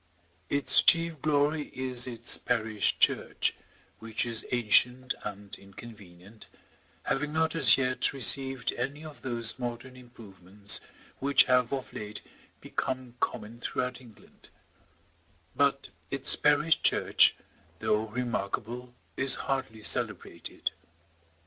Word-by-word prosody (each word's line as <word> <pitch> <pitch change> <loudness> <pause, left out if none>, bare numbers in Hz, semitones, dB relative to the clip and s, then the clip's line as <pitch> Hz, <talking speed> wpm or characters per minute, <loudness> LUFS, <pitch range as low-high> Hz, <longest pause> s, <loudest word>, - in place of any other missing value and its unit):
Its 140 0 +4
chief 165 -3 +4
glory 150 0 0
is 130 -1 -1
its 120 -1 +4
parish 110 -3 -1
church, - - 0 0.5
which 115 +1 -4
is 115 -2 -4
ancient 125 +2 +2
and 100 -1 -8
inconvenient, 100 0 -14 0.6
having 150 +2 -2
not 160 +1 0
as 135 -9 +5
yet 130 -1 -1
received 135 -1 +2
any 140 +5 -5
of 155 -2 -12
those 120 -2 -2
modern 120 +1 -6
improvements 105 -5 -2 0.4
which 140 0 +4
have 125 -2 +1
of 135 -2 -5
late 105 0 -6 0.4
become 130 -2 -5
common 110 +1 -4
throughout 125 +1 -4
England; 115 -4 -19 1.1
but - - 0 0.2
its - - +5
parish - - +2
church, - - +3 0.4
though 105 +1 -1
remarkable, 120 +1 -5 0.2
is 135 0 +6
hardly 115 -5 -4
celebrated. - - -1
125 Hz, 110 wpm, -28 LUFS, 110-135 Hz, 1.1 s, is